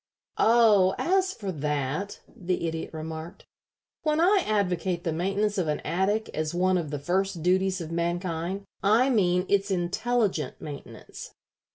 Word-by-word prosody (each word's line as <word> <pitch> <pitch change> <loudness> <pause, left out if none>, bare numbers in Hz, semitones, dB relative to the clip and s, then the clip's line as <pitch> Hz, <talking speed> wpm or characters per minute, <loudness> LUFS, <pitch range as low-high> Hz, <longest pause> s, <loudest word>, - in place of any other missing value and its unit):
"Oh, 215 -5 +5
as 375 +1 +2
for 200 - -5
that," 150 +4 -3
the 180 -1 -3
Idiot 160 0 -4
remarked, 160 +3 -7 0.6
"when 305 0 +1
I 380 +4 +4
advocate 180 -4 0
the 165 - -1
maintenance 195 +4 0
of 175 - 0
an 150 - 0
attic 205 +5 0
as 155 +2 -2
one 185 +1 +2
of 160 -4 -4
the 145 - -3
first 180 +3 -1
duties 190 +1 +2
of 165 -1 -6
mankind, 170 +2 -2 0.2
I 230 +7 +4
mean 180 -5 +2
its 200 0 +1
intelligent 190 - -1
maintenance. 145 -2 -9
185 Hz, 145 wpm, -27 LUFS, 165-205 Hz, 0.6 s, Oh